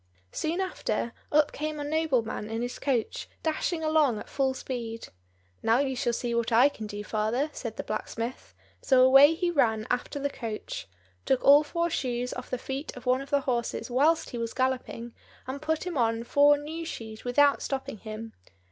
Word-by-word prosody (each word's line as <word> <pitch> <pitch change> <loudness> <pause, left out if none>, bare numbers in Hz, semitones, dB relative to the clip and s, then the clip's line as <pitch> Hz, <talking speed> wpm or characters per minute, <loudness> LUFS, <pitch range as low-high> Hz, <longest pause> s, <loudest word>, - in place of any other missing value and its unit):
Soon 325 +3 -2
after, 360 -10 -2 0.2
up 300 0 +4
came 305 0 -4
a - - -3
nobleman 285 -9 0
in 225 +1 -2
his 245 - -5
coach, 255 -6 -1
dashing 320 +1 -1
along 310 -7 +3
at - - -8
full 265 -1 0
speed. 230 -4 -5 0.5
"Now 225 +1 +3
you 265 -1 0
shall 245 -1 0
see 235 0 -2
what 235 -1 0
I 245 +5 +6
can 220 -6 -7
do, 205 0 -6
father," 220 +8 -1
said 230 -3 -6
the - - -3
blacksmith; 230 +3 -5 0.3
so 260 -2 +5
away 270 +4 +8
he 350 +1 0
ran 220 -8 +2
after 250 +4 -1
the 285 0 -2
coach, 225 -5 -6 0.4
took 260 - +1
all 290 +2 +8
four 340 +3 -1
shoes 250 -3 -2
off 250 - -7
the 255 - -1
feet 270 +5 -5
of 250 - -10
one 255 +1 +2
of 275 - -9
the 285 -1 +2
horses 245 -1 -2
whilst 310 +6 +2
he 240 - -4
was 230 -1 -4
galloping, 255 -2 -2 0.3
and 265 +2 -5
put 315 +2 -1
him 345 -6 -2
on 230 -1 +1
four 290 +4 +5
new 315 +3 -6
shoes 220 -9 -7
without 280 +3 +4
stopping 265 -6 -4
him. 220 +1 -7
260 Hz, 190 wpm, -28 LUFS, 230-290 Hz, 0.5 s, away